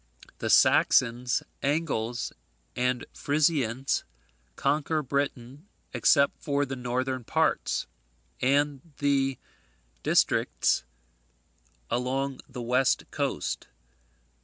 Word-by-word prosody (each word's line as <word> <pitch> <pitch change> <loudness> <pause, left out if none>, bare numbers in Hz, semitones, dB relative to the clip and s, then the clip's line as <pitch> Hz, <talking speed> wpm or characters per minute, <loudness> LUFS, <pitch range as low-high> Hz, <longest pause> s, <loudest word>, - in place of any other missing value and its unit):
The - - -2
Saxons, 125 0 +4 0.2
Angles, 135 -6 -1 0.4
and 125 0 0
Frisians 140 -4 +1 0.5
conquer 150 +2 0
Britain 140 +2 -3 0.3
except 140 -2 +3
the 140 -2 0
northern 130 +1 -2
parts, - - 0 0.6
and 140 +1 +2 0.2
the 135 -2 +1 0.6
districts - - +2 1.1
along 135 +2 -1
the 125 -2 -6
west 125 +2 +1
coast. - - -2
135 Hz, 75 wpm, -27 LUFS, 125-145 Hz, 1.1 s, Saxons